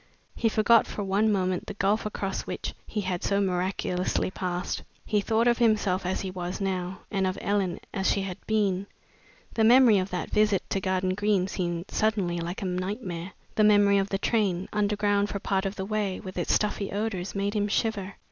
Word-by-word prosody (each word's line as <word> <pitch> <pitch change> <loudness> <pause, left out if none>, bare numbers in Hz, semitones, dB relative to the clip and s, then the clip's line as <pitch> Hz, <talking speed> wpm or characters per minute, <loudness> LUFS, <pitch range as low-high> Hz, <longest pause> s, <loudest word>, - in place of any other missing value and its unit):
He 230 - +1
forgot 220 +1 +4
for 205 - -4
one 200 +3 +2
moment 185 -2 0
the - - -6
gulf 205 +2 +1
across 195 -2 -4
which - - -4
he 210 - -2
had 185 -2 -3
so 200 - +1
miraculously 185 -1 0
passed. 180 -2 -3 0.2
He 210 -1 +1
thought 225 +2 +1
of 240 0 +3
himself 205 -5 +2
as 185 - -1
he 190 - -4
was 180 +1 -4
now, 185 -1 -2
and 195 -2 +1
of 185 +1 -2
Ellen 195 -4 0
as 190 -2 +1
she 200 - 0
had 185 -2 -6
been. 200 -3 +1 0.7
The 225 - +2
memory 235 -2 +7
of 185 +1 -2
that 180 - -4
visit 210 -3 +2
to 195 - 0
Garden 185 0 0
Green 205 -2 +1
seemed 175 -1 -3
suddenly 200 -6 0
like 170 +4 -4
a - - -2
nightmare. 185 -1 -3 0.2
The 215 - +3
memory 205 -1 +5
of 195 0 -1
the 195 - 0
train, 195 -4 0
underground 205 -1 +1
for - - -3
part 195 0 0
of 195 - -5
the 190 - -4
way, 205 -2 -1
with 185 -2 -8
its 175 - -1
stuffy 205 -1 0
odors, 200 -3 -3
made 200 +1 -1
him 205 -1 +1
shiver. 200 -2 -1
195 Hz, 195 wpm, -27 LUFS, 185-210 Hz, 0.7 s, memory